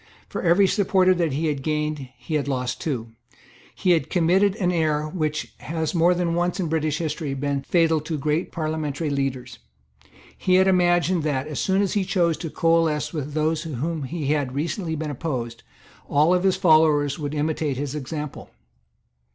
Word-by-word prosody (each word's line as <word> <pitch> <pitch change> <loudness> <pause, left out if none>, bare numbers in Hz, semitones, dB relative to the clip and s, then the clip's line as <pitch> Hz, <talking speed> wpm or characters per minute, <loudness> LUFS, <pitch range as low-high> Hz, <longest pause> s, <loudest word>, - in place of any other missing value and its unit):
For - - -5
every 175 +3 +4
supporter 190 -1 +3
that 170 -5 0
he 155 +4 -1
had 145 -3 -1
gained 150 -2 -2
he 120 +7 -7
had 145 -2 0
lost 125 -2 -2
two. 120 -7 -3 0.6
He 185 - +1
had 160 -4 +2
committed 185 +3 +3
an 180 -5 0
error 155 -3 0
which 155 -2 -3
has 160 -1 -3
more 175 +1 +4
than 175 -1 0
once, 175 +2 0
in 175 -4 -1
British 155 -1 0
history, 155 -4 -3
been 140 0 -1
fatal 165 0 +2
to 155 +1 -4
great 150 +4 -1
parliamentary 155 -2 -2
leaders. 135 -3 -3 0.8
He 185 - +1
had 190 +1 +5
imagined 175 -1 +3
that, 145 -3 -1
as 150 -3 -4
soon 190 +1 +2
as 195 - -1
he 205 - +1
chose 175 -3 +1
to 165 - -5
coalesce 160 -3 +1
with 150 -2 -4
those 155 0 +1
to 160 -4 -5
whom 160 +5 -2
he 150 +3 -4
had 140 -4 -2
recently 165 +3 -2
been 155 -1 -3
opposed, 125 -5 -4 0.5
all 150 +5 +4
his 185 +1 +2
followers 155 -5 +3
would 145 0 -4
imitate 150 -2 -1
his 140 0 -3
example. 150 0 -6
155 Hz, 175 wpm, -23 LUFS, 145-175 Hz, 0.8 s, had